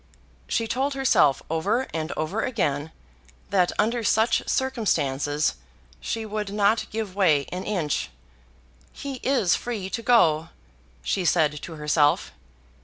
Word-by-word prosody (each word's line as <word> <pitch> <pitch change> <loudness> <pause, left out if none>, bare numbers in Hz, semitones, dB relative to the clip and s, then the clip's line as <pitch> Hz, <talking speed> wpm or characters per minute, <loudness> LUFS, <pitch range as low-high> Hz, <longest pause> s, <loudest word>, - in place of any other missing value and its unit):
She 230 -1 0
told 270 +4 -1
herself 250 - +3
over 200 +11 0
and 160 -1 -3
over 185 +8 -1
again, 155 - -1 0.6
that 185 -3 +3
under 230 +2 +1
such 220 +2 +3
circumstances 150 - 0 0.5
she 225 - -3
would 210 -1 -4
not 210 +2 +2
give 215 -3 -4
way 160 -8 +3
an 180 +1 -4
inch. 175 -8 -1 0.8
"He 275 -2 -6
is 255 -10 +2
free 210 -6 -4
to 230 - -3
go," 165 -10 +3 0.5
she 190 - 0
said 155 -4 +2
to 165 - -8
herself. 150 -1 +2
195 Hz, 125 wpm, -25 LUFS, 155-230 Hz, 0.8 s, herself